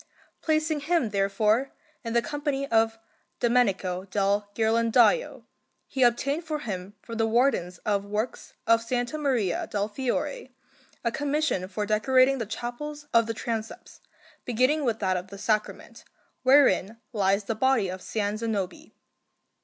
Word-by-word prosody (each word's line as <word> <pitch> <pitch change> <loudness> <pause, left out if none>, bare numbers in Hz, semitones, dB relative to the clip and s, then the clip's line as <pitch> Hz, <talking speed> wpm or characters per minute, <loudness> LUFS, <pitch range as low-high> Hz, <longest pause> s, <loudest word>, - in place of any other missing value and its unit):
Placing 310 -1 +1
him, 290 -6 0
therefore, 210 +6 +1 0.3
in 230 -1 -4
the 235 0 +3
company 285 +3 -2
of 225 0 +2 0.4
Domenico 195 -7 +1
del 200 +1 0
Ghirlandajo, 230 - +3 0.4
he 265 - -4
obtained 275 +6 +2
for 310 -2 -3
him 195 -3 -5
from 230 - -7
the 225 -1 +2
Wardens 225 -7 +1
of 200 -1 +1
Works 210 +4 -4
of 230 +1 +2
S. 245 0 0
Maria 255 - 0
del 205 0 -1
Fiore 260 - -3 0.5
a 235 - +1
commission 290 - -1
for 205 +2 -3
decorating 255 +5 +3
the 225 - -3
chapels 290 +7 -6
of 230 -1 +4
the 225 - -3
transepts, 225 -1 -5 0.4
beginning 255 +6 +1
with 230 -4 0
that 190 -3 0
of 180 +1 -6
the 200 +1 -10
Sacrament, 215 +1 -2 0.4
wherein 260 -6 +4 0.2
lies 200 -1 +2
the 210 - -2
body 245 -2 +2
of 185 +1 -5
S. - - -11 0.3
Zanobi. 220 - -4
230 Hz, 140 wpm, -26 LUFS, 205-265 Hz, 0.5 s, of